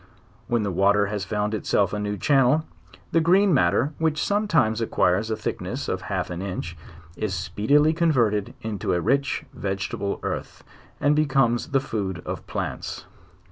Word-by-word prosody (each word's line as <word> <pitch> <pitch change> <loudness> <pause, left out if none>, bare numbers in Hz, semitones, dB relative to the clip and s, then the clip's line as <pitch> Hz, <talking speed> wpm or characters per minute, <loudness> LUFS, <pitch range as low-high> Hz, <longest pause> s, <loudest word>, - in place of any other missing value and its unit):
When 120 -2 +1
the 100 - -1
water 100 +3 +3
has 105 -1 -3
found 105 0 -1
itself 100 -2 +1
a 105 - -1
new 105 0 -2
channel, 140 +4 +3 0.5
the 165 - +3
green 185 +3 +4
matter, 140 +1 +2
which 160 -1 +1
sometimes 165 - +2
acquires 105 -1 +1
a 110 - 0
thickness 105 - -4
of - - -2
half - - -2
an 90 +1 -4
inch, 90 -3 -4 0.4
is 95 0 -2
speedily 140 - +2
converted 120 - +1
into 105 -5 -2
a - - +1
rich 135 +8 0
vegetable 100 0 -3
earth, - - -5 0.4
and 145 +1 +3
becomes 135 -5 +2
the 135 -2 +3
food 100 -9 -4
of - - -5
plants. - - -4
110 Hz, 155 wpm, -24 LUFS, 100-145 Hz, 0.5 s, green